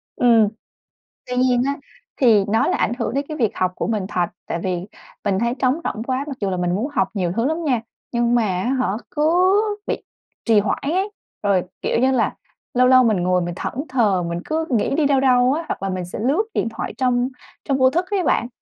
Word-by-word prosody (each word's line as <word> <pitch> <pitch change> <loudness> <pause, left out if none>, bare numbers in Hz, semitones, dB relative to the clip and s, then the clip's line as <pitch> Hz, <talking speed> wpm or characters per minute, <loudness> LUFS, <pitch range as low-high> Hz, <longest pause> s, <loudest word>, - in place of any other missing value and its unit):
Ừm. 235 -5 +5 0.8
Tuy 250 - -3
nhiên 250 -1 +3
á, 280 - +1 0.5
thì 220 -6 +5
nó 220 +2 +2
là - - +1
ảnh - - +1
hưởng 230 - -1
đến 280 +2 -1
cái 310 - -5
việc 225 -7 +1
học 185 -1 +1
của - - -2
mình 215 -4 -1
thật. 180 -3 0 0.2
Tại 170 - -2
vì 180 +1 -3 0.4
mình 195 -2 +1
thấy 235 +2 0
trống 255 -1 +3
rỗng 220 - -3
quá 260 +3 -2
mặc 275 -3 -6
dù 200 - 0
là 185 - -2
mình 175 0 0
muốn 220 +8 -1
học 190 -8 +1
nhiều 185 -5 -1
thứ 230 - +1
lắm 320 +4 -1
nha, 255 -7 +1 0.3
nhưng 240 0 +2
mà 240 - +3 0.2
á 240 - -1
hả, 255 - +1 0.2
cứ 345 +5 +3 0.3
bị - - 0 0.5
trì 225 -2 +5
hoãn 205 0 0
ấy. 375 +8 0 0.3
Rồi, 195 -3 +2 0.2
kiểu - - 0
như 260 +2 +3
là, 250 -3 +1 0.4
lâu 250 0 +4
lâu 255 0 +7
mình 220 -4 +3
ngồi 180 0 +2
mình 175 0 -4
thẫn - - -4 0.2
thờ 210 -8 +2
mình 170 0 -3
cứ 320 +1 -1
nghĩ 245 +1 +1
đi 310 - +2
đâu 280 -1 +3
đâu 255 -1 +4
á, 325 +3 -2
hoặc - - -4
là 195 - -1
mình 185 -1 -3
sẽ 175 - -7
lướt 275 - +2
điện - - 0
thoại - - -5
trong 250 -1 +1 0.4
trong 275 - +1
vô 260 -1 +5
thức 345 +6 0
ấy 390 -3 +1
bạn. 240 - +1
240 Hz, 235 wpm, -21 LUFS, 200-270 Hz, 0.8 s, lâu